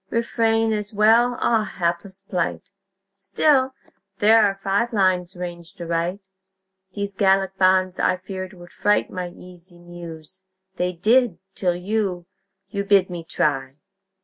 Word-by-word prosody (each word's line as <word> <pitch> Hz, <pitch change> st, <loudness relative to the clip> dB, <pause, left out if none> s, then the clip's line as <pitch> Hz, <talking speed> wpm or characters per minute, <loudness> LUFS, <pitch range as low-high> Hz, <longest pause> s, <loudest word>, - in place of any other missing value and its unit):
"Refrain" 225 Hz, -1 st, +1 dB
as 210 Hz, 0 st, -4 dB
well. 230 Hz, +4 st, +4 dB
Ah, 220 Hz, -2 st, +1 dB
Hapless 175 Hz, +2 st, -2 dB
plight! 180 Hz, -1 st, -3 dB, 0.4 s
Still, 260 Hz, +7 st, +2 dB, 0.4 s
there 220 Hz, +1 st, +5 dB
are 200 Hz, -1 st, +2 dB
five 195 Hz, +4 st, 0 dB
lines 185 Hz, -2 st, +1 dB
ranged 175 Hz, +1 st, -8 dB
aright. 170 Hz, +3 st, -2 dB, 0.7 s
These 200 Hz, -1 st, -3 dB
Gallic 195 Hz, -1 st, +2 dB
bonds, 185 Hz, 0 st, +3 dB
I 185 Hz, -, +2 dB
feared, 185 Hz, +1 st, -7 dB
would 175 Hz, -1 st, -14 dB
fright 205 Hz, 0 st, +1 dB
My 180 Hz, -1 st, -4 dB
easy 175 Hz, 0 st, -14 dB
Muse. 175 Hz, 0 st, -11 dB, 0.4 s
They 180 Hz, 0 st, 0 dB
did, 220 Hz, +3 st, +2 dB, 0.2 s
till 180 Hz, -3 st, 0 dB
you 185 Hz, -1 st, -2 dB, 0.4 s
You 200 Hz, -1 st, -2 dB
bid 195 Hz, -2 st, +3 dB
me 175 Hz, -1 st, -5 dB
try! 135 Hz, -4 st, -1 dB
190 Hz, 130 wpm, -22 LUFS, 175-210 Hz, 0.7 s, there